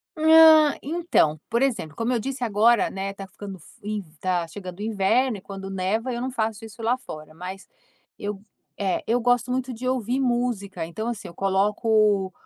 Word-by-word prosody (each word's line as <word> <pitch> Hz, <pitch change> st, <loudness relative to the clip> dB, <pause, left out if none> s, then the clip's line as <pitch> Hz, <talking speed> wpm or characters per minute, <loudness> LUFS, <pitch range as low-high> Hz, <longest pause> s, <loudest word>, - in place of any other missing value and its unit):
Ah, 315 Hz, -1 st, +7 dB
então, 300 Hz, -, +1 dB
por 235 Hz, +2 st, +1 dB
exemplo, 225 Hz, -, -1 dB
como 230 Hz, +2 st, -1 dB
eu 240 Hz, -, +1 dB
disse 260 Hz, +2 st, -4 dB
agora, 225 Hz, +1 st, +3 dB
né, 195 Hz, +1 st, -4 dB
está 195 Hz, -1 st, -9 dB
ficando 195 Hz, 0 st, -9 dB
fri 210 Hz, +6 st, -6 dB
está 175 Hz, +1 st, -1 dB
chegando 180 Hz, +1 st, -9 dB
o -, -, -6 dB
inverno 220 Hz, +3 st, +1 dB
e -, -, -12 dB
quando 195 Hz, 0 st, -8 dB
neva, 195 Hz, +6 st, -1 dB
eu 240 Hz, -, -3 dB
não 260 Hz, 0 st, -2 dB
faço 225 Hz, -2 st, -2 dB
isso 225 Hz, +1 st, -11 dB
lá 235 Hz, +3 st, +1 dB
fora, 155 Hz, -10 st, -10 dB
mas 185 Hz, +4 st, -8 dB, 0.5 s
eu 205 Hz, -1 st, -5 dB, 0.4 s
eh, 195 Hz, -3 st, 0 dB
eu 235 Hz, +2 st, +2 dB
gosto 245 Hz, 0 st, +2 dB
muito 255 Hz, 0 st, -2 dB
de 250 Hz, +2 st, -5 dB
ouvir 255 Hz, 0 st, 0 dB
música, 240 Hz, -8 st, -1 dB
então, 220 Hz, +7 st, -5 dB
assim, 235 Hz, -3 st, -4 dB
eu -, -, -11 dB
coloco 200 Hz, 0 st, +2 dB
215 Hz, 185 wpm, -24 LUFS, 195-245 Hz, 0.5 s, Ah